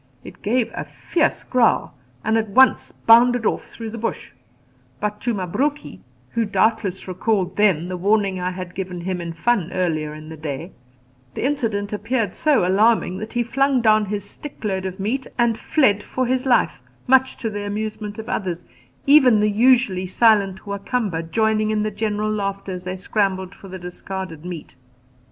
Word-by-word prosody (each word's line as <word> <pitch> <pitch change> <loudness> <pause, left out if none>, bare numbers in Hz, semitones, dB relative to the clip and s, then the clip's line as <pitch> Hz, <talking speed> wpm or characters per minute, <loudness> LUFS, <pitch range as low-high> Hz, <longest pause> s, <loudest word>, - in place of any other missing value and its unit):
It - - -12
gave 230 +1 0
a - - -4
fierce 335 - -1
growl 245 - +2 0.3
and 220 +1 +1
at 220 -1 0
once 260 +6 +4
bounded 240 +1 +5
off - - 0
through 225 -1 -8
the 230 - -6
bush; 230 - -4 0.7
but 210 +3 -3
to 240 - 0
Mabruki 245 - -2 0.3
who 230 - 0
doubtless 215 -3 0
recalled 185 +1 -1
then 190 -6 +3
the 180 0 -4
warning 200 0 +1
I 180 0 -1
had 180 -1 -7
given 185 -2 -5
him 180 0 -3
in 170 -1 -5
fun 190 0 0
earlier 155 -5 -1
in 155 0 -10
the 160 0 -9
day 155 +3 -5 0.6
the - - -2
incident 220 -8 -1
appeared 225 -1 -1
so 290 - +2
alarming 200 -1 +3
that 215 +1 -7
he 240 -1 +1
flung 270 +3 +2
down 215 -2 +4
his 205 0 -3
stick 290 0 -10
load 190 -2 -1
of 190 +1 -7
meat 240 +7 -2
and 235 -2 +3
fled 215 -5 +2
for 255 +4 -2
his 255 +1 0
life, 150 - +2 0.2
much 265 0 +3
to 225 -3 -3
the 205 0 -4
amusement 210 0 -4
of 220 - -6
the 245 - -3
others, 180 -4 -3 0.4
even 265 -6 +6
the 210 0 +2
usually 230 -4 +3
silent 200 -2 +3
Wa 200 0 -4
Kamba 200 -7 -1
joining 215 +6 +1
in 215 -1 +1
the 215 - -1
general 210 0 -1
laughter 200 -2 -3
as 180 -1 -6
they 185 0 -4
scrambled 190 -1 -1
for 195 - -13
the 185 0 -7
discarded 180 -2 -7
meat. 175 -3 -7
210 Hz, 180 wpm, -22 LUFS, 185-230 Hz, 0.7 s, even